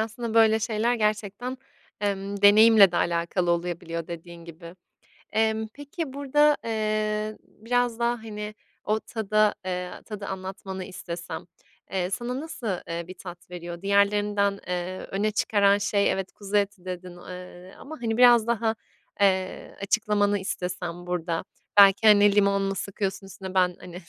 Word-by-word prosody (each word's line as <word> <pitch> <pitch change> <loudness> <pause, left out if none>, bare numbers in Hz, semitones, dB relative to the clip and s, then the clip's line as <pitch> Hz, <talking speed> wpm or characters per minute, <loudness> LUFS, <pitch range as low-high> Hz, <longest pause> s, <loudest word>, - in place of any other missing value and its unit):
aslında 225 +1 -3
böyle 220 -1 +5
şeyler 225 +2 +1
gerçekten, 215 +3 -2 0.4
emm, 200 0 -2
deneyimle 210 -2 +8
de - - -1
alakalı 170 +1 0
olabiliyor 170 -1 -2
dediğin 170 0 -9
gibi. 170 +1 -11 0.6
Emm, 220 0 +1
peki 290 0 -6
burada, 290 +2 +3
eee, 215 -1 -1
biraz 240 +1 -1
daha, 240 +1 +1
hani, 210 -1 -6 0.3
o 215 +1 0
tada, 215 -2 +1
eee, 180 -1 -3
tadı 210 -2 -7
anlatmanı 190 0 -6
istesem, 175 -2 -7 0.5
eee, 185 -1 -1
sana 240 +6 -3
nasıl, 290 -6 -6 0.2
eee, 170 0 -4
bir 185 - -8
tat 175 -1 -11
veriyor? 175 -1 -7
Diğerlerinden, 200 0 +2
eee, 180 +1 -3
öne 210 +2 0
çıkaran 200 -1 +3
şey 200 0 +1
evet, 190 -1 -3
"kuzu 205 0 -2
eti" 200 -2 -1
dedin, 180 -1 -7
eee, 180 +1 -10
ama, 315 +3 -9
hani, 225 -1 -1
biraz 240 -2 +6
daha, 225 -1 +1 0.5
eee, 190 -2 +1
açıklamanı 205 -1 +1
istesem 180 -2 -4
burada. 170 -1 -2 0.3
Belki, 200 +2 +7
hani, 205 -1 +6
limon 200 -1 +3
mu 195 0 -1
sıkıyorsun 195 0 -3
üstüne? 190 -1 -8
Ben, 180 -1 +2
hani, 180 -1 -10
200 Hz, 140 wpm, -26 LUFS, 180-220 Hz, 0.6 s, deneyimle